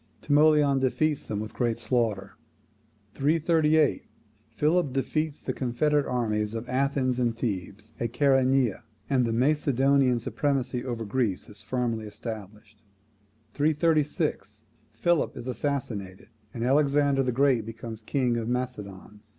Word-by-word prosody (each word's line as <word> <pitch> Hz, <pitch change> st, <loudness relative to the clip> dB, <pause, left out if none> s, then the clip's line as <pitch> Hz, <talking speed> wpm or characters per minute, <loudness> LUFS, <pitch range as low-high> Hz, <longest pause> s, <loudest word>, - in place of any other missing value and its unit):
Timoleon 145 Hz, -2 st, +4 dB
defeats 145 Hz, +3 st, 0 dB
them 105 Hz, -, -4 dB
with 110 Hz, 0 st, -6 dB
great 120 Hz, -2 st, 0 dB
slaughter. 110 Hz, -4 st, -1 dB, 0.8 s
338. 155 Hz, 0 st, +2 dB, 0.4 s
Philip 155 Hz, -1 st, +1 dB
defeats 150 Hz, +3 st, -1 dB
the -, -, -4 dB
confederate 140 Hz, +4 st, 0 dB
armies 110 Hz, -3 st, -1 dB
of 115 Hz, +2 st, -5 dB
Athens 130 Hz, -1 st, 0 dB
and 120 Hz, -2 st, 0 dB
Thebes 105 Hz, -1 st, -4 dB
at 115 Hz, -1 st, -2 dB
Chaeronea, 135 Hz, -3 st, +2 dB, 0.3 s
and 130 Hz, -3 st, +3 dB
the -, -, -1 dB
Macedonian 135 Hz, 0 st, +2 dB
supremacy 130 Hz, 0 st, -1 dB
over 120 Hz, -3 st, -4 dB
Greece 105 Hz, -3 st, -1 dB
is 105 Hz, 0 st, -13 dB
firmly 115 Hz, -4 st, -2 dB
established. 105 Hz, -1 st, -9 dB, 0.7 s
336. 150 Hz, -, 0 dB, 0.3 s
Philip 155 Hz, +9 st, 0 dB
is -, -, -7 dB
assassinated, 120 Hz, -8 st, -4 dB, 0.2 s
and 115 Hz, -, -5 dB
Alexander 140 Hz, +1 st, +3 dB
the 125 Hz, -1 st, 0 dB
Great 130 Hz, -2 st, +2 dB
becomes 115 Hz, 0 st, -8 dB
king 125 Hz, +1 st, 0 dB
of 115 Hz, -1 st, -3 dB
Macedon. 105 Hz, -5 st, -5 dB
125 Hz, 120 wpm, -27 LUFS, 115-140 Hz, 0.8 s, Timoleon